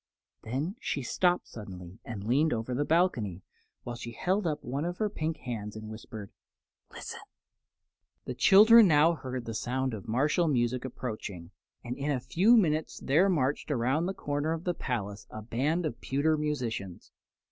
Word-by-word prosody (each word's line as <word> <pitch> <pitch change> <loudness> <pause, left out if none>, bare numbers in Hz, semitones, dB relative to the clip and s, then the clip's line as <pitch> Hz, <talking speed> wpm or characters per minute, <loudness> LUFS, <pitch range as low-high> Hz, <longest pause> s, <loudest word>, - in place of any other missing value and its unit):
Then 145 - -3
she 140 - -2
stopped 180 +7 +1
suddenly 95 -3 -10
and 110 -4 -6
leaned 135 +8 +2
over 115 +2 -3
the 140 +4 +1
balcony, 125 - +1 0.4
while 120 - -5
she 120 0 -7
held 185 - 0
up 150 -2 -2
one 135 +5 -3
of 175 +1 -3
her 210 -2 0
pink 160 -3 -2
hands 110 -4 -5
and 110 0 -7
whispered: 110 -2 -9 0.6
"Listen!" - - -7 1.1
The 125 - -3
children 215 - +8
now 160 +1 +5
heard 130 -5 -5
the 115 - -4
sound 130 +3 -1
of 110 +1 -7
martial 145 +9 +2
music 125 -3 +1
approaching, 105 -9 -6 0.3
and 125 0 -4
in 140 +2 -3
a 140 -3 +1
few 185 - +4
minutes 155 -6 +1
there 165 +9 +3
marched 145 -5 0
around 140 +5 +1
the 190 - -3
corner 145 +2 -1
of 165 0 -5
the 180 - 0
palace 105 - -4
a 110 - -8
band 145 +10 0
of 115 -6 -4
pewter 145 +4 +1
musicians. 125 - -3
130 Hz, 170 wpm, -29 LUFS, 115-160 Hz, 1.1 s, children